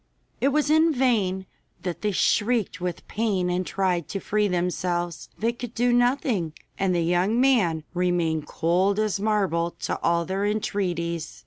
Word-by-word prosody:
It 270 - +2
was 295 +1 +2
in 320 +1 +5
vain 215 -9 +1 0.4
that 175 -2 -4
they 210 - +1
shrieked 205 0 +1
with 180 -2 -4
pain 200 -5 0
and 180 +1 0
tried 180 -4 0
to 195 - -4
free 210 +1 +1
themselves. 175 -1 -2
They 230 +2 0
could 240 -1 -8
do 245 +1 +2
nothing, 245 - +1 0.3
and 190 -2 +1
the 170 - +1
young 180 +7 +2
man 210 - +3
remained 175 -4 0
cold 185 +5 +1
as 215 -2 0
marble 195 -5 0
to - - -2
all 170 0 +1
their 190 +2 -2
entreaties. 175 -6 -2
190 Hz, 155 wpm, -25 LUFS, 175-220 Hz, 0.4 s, in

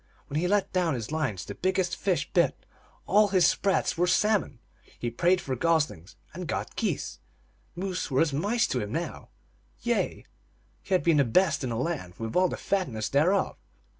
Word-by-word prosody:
When 145 - -1
he 180 - 0
let 205 +1 +1
down 175 -5 +1
his 115 +1 -5
lines 140 - -2
the - - -6
biggest 185 -1 0
fish 180 -6 0
bit; - - +1 0.4
all 210 +2 +5
his 185 -4 +3
sprats 190 -1 +1
were 180 - +3
salmon; 190 - +2 0.4
he 120 - -3
prayed 175 +10 +2
for 130 -6 -3
gos 160 +2 +2
lings, 85 +4 -14 0.2
and - - -6
got - - -3
geese; - - -2 0.6
moose 185 +1 -3
were 135 -1 +2
as 160 -3 +2
mice 205 +11 +1
to 125 - 0
him 105 - -5
now; 165 +7 -4 0.5
yea, 235 -1 -1 0.6
he 195 - -4
had 180 - +1
the 160 -4 +4
best 145 +4 +2
in 130 - -2
the 115 - -2
land, 125 - -3
with 115 -1 -5
all 180 0 +4
the - - -4
fatness 125 - -1
thereof. 180 +8 +2
170 Hz, 185 wpm, -27 LUFS, 135-185 Hz, 0.6 s, all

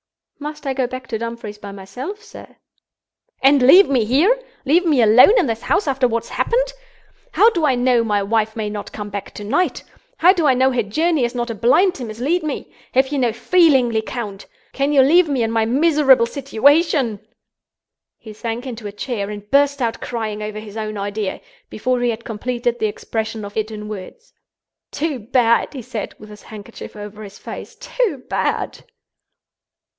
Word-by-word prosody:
"Must 300 +1 -7
I 270 - -1
go 260 -2 -1
back 255 +1 -7
to 220 - -3
Dumfries 230 -2 -6
by 205 -1 -8
myself, 250 - -8
sir?" - - -13 0.9
"And 275 0 +5
leave 350 +11 +7
me 260 -5 +2
here? 290 - +3 0.3
Leave 325 +6 +3
me 310 -7 +2
alone 250 - +7
in 400 - +3
this 225 -2 -3
house 395 - 0
after 265 -2 +2
what 230 -1 -1
has - - -14
happened? - - 0 0.6
How 450 +3 +5
do 340 -7 -2
I 265 - +3
know 245 -1 +2
my 205 -3 0
wife 220 +1 0
may 220 -2 -3
not 210 0 -6
come 205 -1 -7
back 200 0 -7
to 210 - -7
night? 360 - 0 0.3
How 360 +3 +6
do 335 -6 +1
I 260 - +4
know 260 +1 +3
her 250 -2 +1
journey 310 - 0
is 240 +1 -2
not 240 -1 -2
a - - -3
blind 350 - +3
to 260 - -7
mislead 250 +11 -1
me? 305 -3 -5 0.2
Have 265 +1 +3
you 285 -1 -1
no 245 -3 +2
feeling, 265 0 +3
Lecount? 220 -2 -4 0.3
Can 275 +1 0
you 280 -2 +5
leave 330 +4 +4
me 265 -4 0
in 225 - -1
my 225 -1 +1
miserable 275 -1 +4
situation—?" 275 - +2 1.0
He 220 - -11
sank 230 +3 -5
into 235 -4 -6
a - - -6
chair 205 -1 -4
and 205 -1 -8
burst 280 0 +3
out 230 -1 -2
crying 220 -3 -4
over 210 0 -5
his 215 0 -9
own 215 -1 -4
idea, 200 0 -3 0.3
before 250 -1 -1
he 245 - +1
had 230 0 -4
completed 240 +2 -2
the 215 - +1
expression 220 0 -4
of 205 - -10
it 215 0 -1
in 210 -1 -7
words. 215 - -9 0.6
"Too 300 -4 -3
bad!" 235 +4 +1
he 255 - -6
said, 215 0 -6
with 215 - -13
his 210 0 -12
handkerchief 215 +1 -11
over 210 0 -9
his 200 -1 -10
face—"too 480 - -4
bad!" - - -2
240 Hz, 190 wpm, -20 LUFS, 215-285 Hz, 1.0 s, leave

